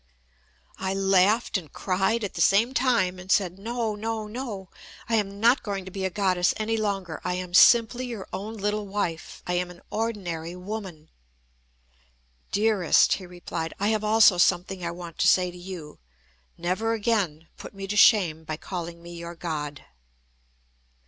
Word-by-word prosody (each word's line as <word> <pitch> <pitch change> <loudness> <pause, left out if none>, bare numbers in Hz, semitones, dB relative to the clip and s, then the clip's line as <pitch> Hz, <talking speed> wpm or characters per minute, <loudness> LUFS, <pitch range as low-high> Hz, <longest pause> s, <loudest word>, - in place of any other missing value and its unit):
I 190 0 -2
laughed 195 +3 +3
and 155 -6 -15
cried 195 +4 0
at 205 - -3
the - - -3
same 225 +6 +4
time, 235 -9 +1
and 185 +1 -6
said: 185 -2 +2
"No, 230 +1 -2
no, 220 +1 -3
no! 210 -5 -6 0.4
I 235 - -3
am 200 -2 0
not 235 +4 +4
going 200 -3 -4
to 190 - -9
be 190 0 -3
a - - +1
Goddess 185 -2 +1
any 220 +1 -1
longer 195 -7 -2
I 180 0 -1
am 180 -1 -5
simply 240 +5 +6
your 225 -6 -6
own 205 +4 -5
little 210 0 -2
wife. 190 -5 -4
I 180 - -2
am 180 0 -1
an 175 -1 -12
ordinary 180 -7 -3
woman." 180 -5 -7 1.4
"Dearest," 205 -3 +3
he 185 - -5
replied, 175 -2 -5
"I 205 +2 +1
have 215 -1 0
also 215 -3 +5
something 180 +1 +2
I 170 - -1
want 170 -1 -9
to - - +3
say 180 -1 +4
to 180 - -12
you. 175 -4 -9 0.6
Never 185 +7 -1
again 200 -8 -1
put - - -11
me 195 0 -6
to 200 +2 -3
shame 180 -7 +5
by 155 -1 -5
calling 170 -1 -6
me 175 0 -9
your 170 0 -7
God." 150 -4 -5
190 Hz, 170 wpm, -26 LUFS, 175-215 Hz, 1.4 s, simply